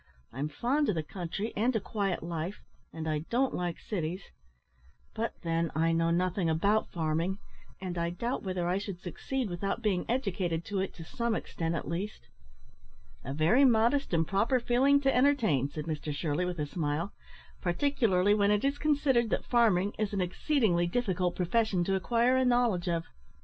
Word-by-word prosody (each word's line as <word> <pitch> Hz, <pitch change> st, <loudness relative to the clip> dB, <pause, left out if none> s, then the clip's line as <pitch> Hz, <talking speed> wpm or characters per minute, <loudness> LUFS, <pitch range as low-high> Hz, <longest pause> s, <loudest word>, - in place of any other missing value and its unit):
I'm 140 Hz, +5 st, -3 dB
fond 265 Hz, -, 0 dB
of 205 Hz, -, +1 dB
the 160 Hz, -, -1 dB
country 185 Hz, +6 st, -4 dB
and 240 Hz, +4 st, +1 dB
a -, -, +3 dB
quiet 195 Hz, -4 st, -2 dB
life, 170 Hz, +3 st, -4 dB, 0.3 s
and 160 Hz, -1 st, -5 dB
I 155 Hz, -1 st, 0 dB
don't 260 Hz, +3 st, +1 dB
like 175 Hz, -2 st, -2 dB
cities; 180 Hz, -2 st, -4 dB, 0.8 s
but, 225 Hz, +1 st, -3 dB
then, 165 Hz, 0 st, 0 dB
I 165 Hz, +1 st, +2 dB
know 165 Hz, 0 st, +2 dB
nothing 180 Hz, 0 st, +1 dB
about 200 Hz, +7 st, +2 dB
farming, 165 Hz, +3 st, -1 dB, 0.4 s
and 180 Hz, -2 st, -4 dB
I 170 Hz, 0 st, 0 dB
doubt 235 Hz, +9 st, -3 dB
whether 185 Hz, -3 st, -2 dB
I 180 Hz, +2 st, +1 dB
should 200 Hz, -3 st, -6 dB
succeed 245 Hz, +8 st, -3 dB
without 195 Hz, +5 st, -3 dB
being 190 Hz, -5 st, 0 dB
educated 185 Hz, -9 st, -1 dB
to 200 Hz, 0 st, -2 dB
it 190 Hz, -, -3 dB
to 165 Hz, -, -8 dB
some 235 Hz, +6 st, -1 dB
extent 165 Hz, -4 st, -3 dB
at -, -, -4 dB
least." 170 Hz, -, -5 dB, 0.9 s
"A 135 Hz, -, -5 dB
very 160 Hz, -, +4 dB
modest 245 Hz, +3 st, +3 dB
and 165 Hz, -2 st, +2 dB
proper 220 Hz, +7 st, +2 dB
feeling 260 Hz, +4 st, +3 dB
to 270 Hz, -1 st, +2 dB
entertain," 235 Hz, -, +3 dB
said 150 Hz, +1 st, -6 dB
Mr 155 Hz, -2 st, -3 dB
Shirley, 150 Hz, +4 st, -1 dB
with 180 Hz, -1 st, -3 dB
a 150 Hz, -, -1 dB
smile; 155 Hz, +4 st, -2 dB, 0.5 s
"particularly 205 Hz, -1 st, +2 dB
when 205 Hz, -1 st, +3 dB
it 210 Hz, +4 st, +2 dB
is 280 Hz, +1 st, 0 dB
considered 280 Hz, -6 st, +2 dB
that -, -, -1 dB
farming 210 Hz, -5 st, +3 dB
is 210 Hz, -1 st, -1 dB
an 200 Hz, -, 0 dB
exceedingly 180 Hz, -, +1 dB
difficult 180 Hz, -4 st, 0 dB
profession 190 Hz, 0 st, +1 dB
to 195 Hz, -, 0 dB
acquire 235 Hz, +6 st, +2 dB
a 260 Hz, -, +3 dB
knowledge 240 Hz, -8 st, +2 dB
of. 165 Hz, -1 st, 0 dB
190 Hz, 175 wpm, -30 LUFS, 170-235 Hz, 0.9 s, very